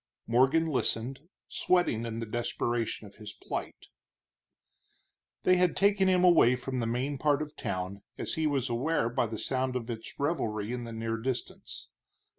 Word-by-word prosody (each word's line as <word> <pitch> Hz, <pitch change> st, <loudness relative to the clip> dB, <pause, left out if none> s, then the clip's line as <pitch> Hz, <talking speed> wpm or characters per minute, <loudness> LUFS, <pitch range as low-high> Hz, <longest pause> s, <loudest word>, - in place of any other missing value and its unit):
Morgan 135 Hz, +7 st, +4 dB
listened, 135 Hz, 0 st, -1 dB, 0.2 s
sweating 175 Hz, -11 st, +1 dB
in 115 Hz, 0 st, -4 dB
the 115 Hz, -, -3 dB
desperation 115 Hz, 0 st, -2 dB
of 100 Hz, -, -14 dB
his 105 Hz, -1 st, -8 dB
plight. -, -, -6 dB, 1.6 s
They 185 Hz, 0 st, +5 dB
had 180 Hz, -1 st, +2 dB
taken 200 Hz, 0 st, +4 dB
him 185 Hz, -1 st, +4 dB
away 165 Hz, -9 st, +6 dB
from 130 Hz, 0 st, -4 dB
the 115 Hz, -, -1 dB
main 130 Hz, +4 st, -1 dB
part 145 Hz, -2 st, +3 dB
of 150 Hz, 0 st, -5 dB
town, 95 Hz, +2 st, -4 dB, 0.2 s
as -, -, -2 dB
he 160 Hz, -1 st, +1 dB
was 140 Hz, -4 st, 0 dB
aware 120 Hz, +1 st, 0 dB
by 120 Hz, 0 st, 0 dB
the 110 Hz, 0 st, -5 dB
sound 130 Hz, +2 st, -1 dB
of 120 Hz, -1 st, -3 dB
its 115 Hz, -1 st, -8 dB
revelry 115 Hz, -8 st, -1 dB
in 120 Hz, -1 st, -4 dB
the 115 Hz, -, -7 dB
near 115 Hz, 0 st, -2 dB
distance. 125 Hz, +1 st, -5 dB
125 Hz, 165 wpm, -30 LUFS, 115-150 Hz, 1.6 s, away